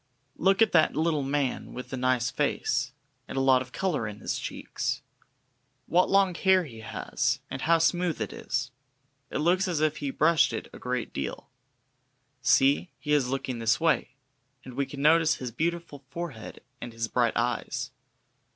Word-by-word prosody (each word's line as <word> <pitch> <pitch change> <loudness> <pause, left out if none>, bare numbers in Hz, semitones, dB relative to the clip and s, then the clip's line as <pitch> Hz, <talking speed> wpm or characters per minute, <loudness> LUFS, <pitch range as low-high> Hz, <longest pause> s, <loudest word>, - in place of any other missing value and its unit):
Look 195 +4 +4
at - - +1
that 160 -2 +4
little 155 -1 +1
man 135 -1 -2
with 125 - -7
the - - -2
nice 125 -1 +1
face, 130 -3 0 0.4
and - - -6
a - - +3
lot 135 -1 +4
of 125 -1 -8
colour 170 - -1
in 105 -1 -7
his - - -3
cheeks! - - -4 0.8
What 180 +2 +3
long 195 -2 +4
hair 190 +1 +3
he 120 -8 -10
has! 110 - -2
and 130 0 -4
how 165 +1 +4
smooth 175 0 +1
it - - -3
is! 125 0 -3 0.6
It - - -3
looks 180 +6 +2
as 170 -4 -1
if 155 0 +1
he 140 - -3
brushed 155 +2 +3
it - - -4
a - - -10
great 125 -2 -3
deal. 70 - -5 0.9
See, 135 +7 +3
he 150 -1 -2
is 135 -4 +2
looking 130 -2 -3
this 115 +2 +2
way, 165 -5 +1 0.5
and 130 - -10
we 140 +2 -1
can 140 -1 -6
notice 160 +1 +5
his 125 -2 -6
beautiful 165 +2 -3
forehead 160 -11 -7 0.2
and 120 - -7
his 115 0 -2
bright 120 -1 +1
eyes. 120 +1 -2
140 Hz, 175 wpm, -27 LUFS, 125-165 Hz, 0.9 s, notice